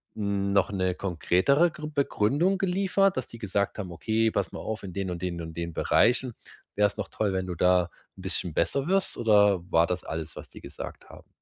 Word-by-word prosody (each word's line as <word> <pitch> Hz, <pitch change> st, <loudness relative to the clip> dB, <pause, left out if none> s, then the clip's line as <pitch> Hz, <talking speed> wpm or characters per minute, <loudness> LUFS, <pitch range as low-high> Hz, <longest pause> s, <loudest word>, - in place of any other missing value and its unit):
hm, 100 Hz, -2 st, -1 dB
noch 100 Hz, +1 st, +2 dB
'ne 95 Hz, -2 st, 0 dB
konkretere 100 Hz, -, +2 dB
Gr 155 Hz, -1 st, -7 dB
Begründung 145 Hz, -, +1 dB
geliefert, 195 Hz, 0 st, +2 dB
dass 130 Hz, -, -3 dB
die 115 Hz, -, -11 dB
gesagt 100 Hz, -2 st, -1 dB
haben: 95 Hz, -4 st, -5 dB
„Okay, 110 Hz, +5 st, 0 dB
pass -, -, -1 dB
mal -, -, -7 dB
auf, 110 Hz, -1 st, -4 dB
in 95 Hz, -3 st, -8 dB
den 95 Hz, -2 st, -3 dB
und 85 Hz, 0 st, -5 dB
den 90 Hz, -2 st, -3 dB
und 80 Hz, 0 st, -7 dB
den 85 Hz, -1 st, -4 dB
Bereichen 120 Hz, +5 st, +2 dB, 0.4 s
wäre 105 Hz, 0 st, +4 dB
es -, -, -10 dB
noch -, -, -3 dB
toll, 100 Hz, -3 st, -1 dB
wenn 95 Hz, 0 st, -1 dB
du 90 Hz, -, -4 dB
da 90 Hz, 0 st, +3 dB, 0.3 s
'n -, -, -10 dB
bisschen 90 Hz, -3 st, -3 dB
besser 140 Hz, +3 st, 0 dB
wirst.“ 195 Hz, +1 st, +1 dB
Oder 105 Hz, -5 st, +4 dB
war 80 Hz, +1 st, +5 dB
das 90 Hz, +1 st, -3 dB
alles, 80 Hz, -1 st, -5 dB
was -, -, -10 dB
die -, -, -13 dB
gesagt -, -, -9 dB
haben? -, -, -14 dB
100 Hz, 215 wpm, -27 LUFS, 90-125 Hz, 0.4 s, war